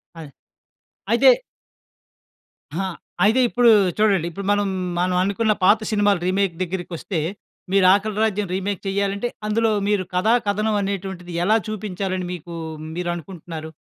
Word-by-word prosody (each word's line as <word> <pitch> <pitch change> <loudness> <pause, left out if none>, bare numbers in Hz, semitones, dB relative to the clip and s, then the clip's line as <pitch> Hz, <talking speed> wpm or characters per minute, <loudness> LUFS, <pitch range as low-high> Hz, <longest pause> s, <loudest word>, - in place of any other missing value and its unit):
అదే. 155 -4 -10 0.8
అయితే - - +6 1.5
ఆహా! 190 +1 -1 0.4
అయితే 225 +5 +4
ఇప్పుడు 245 0 +4 0.3
చూడండి 195 -6 +2
ఇప్పుడు 195 +3 -7
మనం 205 -1 +1 0.3
మనం 180 0 +1
అనుకున్న 215 +2 +1
పాత 210 +4 +6
సినిమాలు 205 -3 +2
రీమేక్ 190 -2 +1
దగ్గరికొస్తే 175 -1 -4 0.5
మీరు 195 -1 +4
'ఆకలి 210 +1 0
రాజ్యం' 210 -3 0
రీమేక్ 195 0 -3
చేయాలంటే 200 +3 -1 0.2
అందులో 225 +1 +2 0.2
మీరు 205 -2 +1
కథా, 210 +6 +3
కథనం 215 +1 +1
అనేటువంటిది 190 -2 -4
ఎలా 215 +4 +4
చూపించాలని 190 -3 -3
మీకు 170 0 -8 0.4
మీరు 175 0 -2
అనుకుంటున్నారు? 165 -2 -8
195 Hz, 125 wpm, -22 LUFS, 180-210 Hz, 1.5 s, అయితే